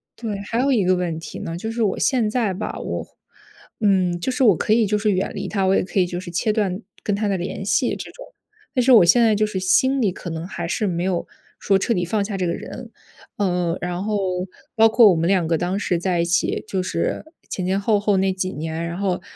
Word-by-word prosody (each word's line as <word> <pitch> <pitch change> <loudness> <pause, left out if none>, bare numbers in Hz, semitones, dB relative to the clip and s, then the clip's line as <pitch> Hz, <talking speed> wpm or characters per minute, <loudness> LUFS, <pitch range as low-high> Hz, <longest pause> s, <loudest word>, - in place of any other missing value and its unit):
对， 215 -4 -4
还 230 +2 +1
有 275 +1 +2
一 220 -8 +2
个 185 0 +3
问 175 -3 -2
题 165 - -8
呢， 165 0 -5
就 220 +5 -4
是 230 0 0
我 200 - 0
现 240 -5 +2
在 220 -4 0
吧， 195 +4 -5
我 - - -4 0.8
嗯， 185 -4 +2
就 260 - -1
是 260 0 +1
我 205 -6 +6
可 210 - -2
以 225 0 +4
就 210 - +1
是 210 0 +1
远 190 0 -1
离 - - -4
他， 195 -2 0
我 190 +1 +3
也 - - +2
可 190 +1 -2
以 180 - +4
就 175 0 -5
是 175 -2 -8
切 215 +5 0
断 200 -2 -1 0.2
跟 205 - 0
他 210 +1 -1
的 200 - +1
联 180 +2 -5
系， 205 +6 +2
这 - - -7
种， - - -11 0.5
但 255 - +2
是 255 +1 +5
我 220 - +8
现 185 +8 +5
在 225 -2 +4
就 215 +1 +2
是 210 -3 -3
心 260 +9 +3
里 205 -7 +1
可 180 - -7
能 165 +1 -5
还 175 -3 -5
是 210 +2 0
没 175 -1 -1
有 185 -2 -1 0.3
说 195 - +2
彻 230 +5 0
底 180 -1 -1
放 205 +3 0
下 200 -1 -4
这 180 - -1
个 170 - 0
人。 - - -8 0.4
呃， 180 -3 0
然 180 +2 -3
后 215 - -1 0.6
包 225 -1 +6
括 225 -1 +6
我 - - +2
们 165 +1 +1
两 185 -3 +2
个 165 0 +1
当 180 +3 -1
时 185 -3 0
在 175 -1 0
一 - - +1
起， 175 +1 0
就 190 -3 -1
是 170 - -2 0.2
前 185 - -3
前 190 +2 +1
后 205 0 +2
后 205 -1 +1
那 190 0 +2
几 185 0 -2
年， 160 +2 -4
然 170 - -5
后， 190 -2 -1
195 Hz, 275 characters per minute, -22 LUFS, 180-215 Hz, 0.8 s, 我